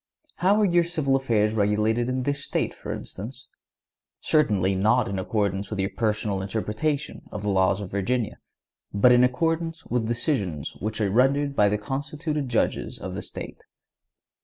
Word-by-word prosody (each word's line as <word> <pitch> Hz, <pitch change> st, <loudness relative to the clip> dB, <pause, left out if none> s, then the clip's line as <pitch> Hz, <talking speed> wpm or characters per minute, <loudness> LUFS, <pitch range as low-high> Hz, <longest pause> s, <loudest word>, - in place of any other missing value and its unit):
How 195 Hz, +5 st, +3 dB
are 210 Hz, -, +4 dB
your 175 Hz, -2 st, +4 dB
civil 155 Hz, -6 st, 0 dB
affairs 110 Hz, -5 st, +2 dB
regulated 110 Hz, +3 st, +1 dB
in 130 Hz, 0 st, -1 dB
this 140 Hz, +1 st, -2 dB
State, -, -, -1 dB
for -, -, -7 dB
instance? 120 Hz, +5 st, -7 dB, 0.7 s
Certainly 105 Hz, -, +2 dB
not 110 Hz, +5 st, +3 dB
in 100 Hz, -1 st, -2 dB
accordance 100 Hz, 0 st, -1 dB
with 105 Hz, -, -4 dB
your 95 Hz, +1 st, 0 dB
personal 105 Hz, -3 st, 0 dB
interpretation 110 Hz, +9 st, -2 dB
of 105 Hz, -, -6 dB
the 105 Hz, -, 0 dB
laws 95 Hz, +1 st, +2 dB
of 95 Hz, -, -7 dB
Virginia, 105 Hz, +4 st, -1 dB, 0.5 s
but 100 Hz, +5 st, +5 dB
in 125 Hz, 0 st, +6 dB
accordance 165 Hz, +5 st, 0 dB
with 120 Hz, -2 st, -1 dB
decisions 115 Hz, -, -1 dB
which 110 Hz, +2 st, -4 dB
are 100 Hz, -2 st, +1 dB
rendered 140 Hz, +5 st, +2 dB
by 105 Hz, -4 st, +4 dB
the 105 Hz, -, +1 dB
constituted 145 Hz, +4 st, -3 dB
judges 115 Hz, -, 0 dB
of -, -, -6 dB
the -, -, -4 dB
State. -, -, -7 dB
115 Hz, 160 wpm, -25 LUFS, 105-140 Hz, 0.7 s, in